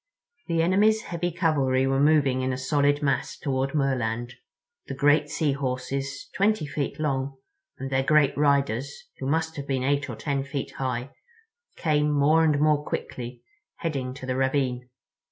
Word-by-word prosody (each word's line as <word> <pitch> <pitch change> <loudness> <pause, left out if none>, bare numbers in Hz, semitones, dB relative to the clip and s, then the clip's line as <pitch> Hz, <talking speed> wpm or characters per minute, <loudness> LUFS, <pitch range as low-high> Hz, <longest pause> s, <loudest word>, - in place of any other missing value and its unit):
The 165 -2 +1
enemy's 210 +5 +3
heavy 175 +1 -3
cavalry 140 -7 +1
were 135 0 +1
moving 140 -3 +3
in 130 0 0
a 130 - -2
solid 145 +2 +1
mass 140 -1 0
toward 135 0 -1
Merland—the 125 - -3
great 145 +2 +3
Sea 150 -2 0
Horses, 135 0 -3
twenty 200 -2 +2
feet 145 0 -3
long, 135 -2 -1 0.4
and 135 0 -6
their 130 0 +2
great 145 0 +3
riders, 140 - 0
who 130 - -3
must 160 +2 0
have 140 -1 -5
been 130 -2 -1
eight 140 +1 0
or 120 - -4
ten 140 +3 -2
feet 140 0 -4
high, 130 0 -2 0.6
came 150 -2 +1
more 150 +3 +4
and 150 -3 +3
more 150 -1 +3
quickly, 125 -4 -5 0.3
heading 135 -6 -3
to 135 - -8
the 130 0 -2
ravine. 130 -2 0
140 Hz, 155 wpm, -26 LUFS, 130-150 Hz, 0.6 s, more